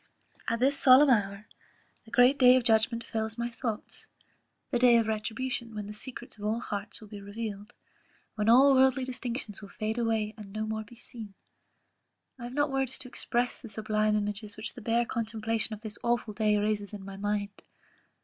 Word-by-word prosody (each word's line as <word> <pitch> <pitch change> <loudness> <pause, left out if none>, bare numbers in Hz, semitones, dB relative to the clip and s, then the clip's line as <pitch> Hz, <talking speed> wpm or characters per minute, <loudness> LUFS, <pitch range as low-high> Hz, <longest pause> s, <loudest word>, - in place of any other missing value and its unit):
"At 230 0 0
this 275 +3 +3
solemn 265 +2 +7
hour, 200 -2 +1 0.6
the - - -15
great 245 +4 +5
day 250 -1 +8
of 255 - +2
judgment 230 +1 +2
fills 220 0 -3
my 235 0 -2
thoughts; 230 -3 -4 0.6
the 245 - +1
day 245 -1 +6
of 230 - +2
retribution, 225 +2 -3
when 210 -1 -4
the 210 - -7
secrets 240 +1 -6
of - - -9
all 215 +2 0
hearts 205 -3 -4
will 215 - -12
be 205 -1 -9
revealed; 205 0 -6 0.6
when 215 0 0
all 270 +4 +7
worldly 265 0 +4
distinctions 245 -4 -4
will 200 - -10
fade 215 +3 -3
away, 220 -2 0
and 205 -2 -10
be 215 - -4
no 215 - -1
more 220 0 -3
seen. 225 -4 -10 1.0
I 240 - -6
have 245 - -7
not 290 -1 +1
words 270 -1 -1
to 255 - -8
express 245 0 -2
the 230 - -9
sublime 215 0 0
images 210 0 -3
which 215 +2 -4
the 245 - -10
bare 230 +2 +1
contemplation 225 -1 -2
of 210 - -16
this 215 -2 -8
awful 235 -2 0
day 210 0 +2
raises 205 0 -1
in 195 -2 -9
my 195 0 -8
mind. 205 0 -3
225 Hz, 190 wpm, -29 LUFS, 210-245 Hz, 1.0 s, day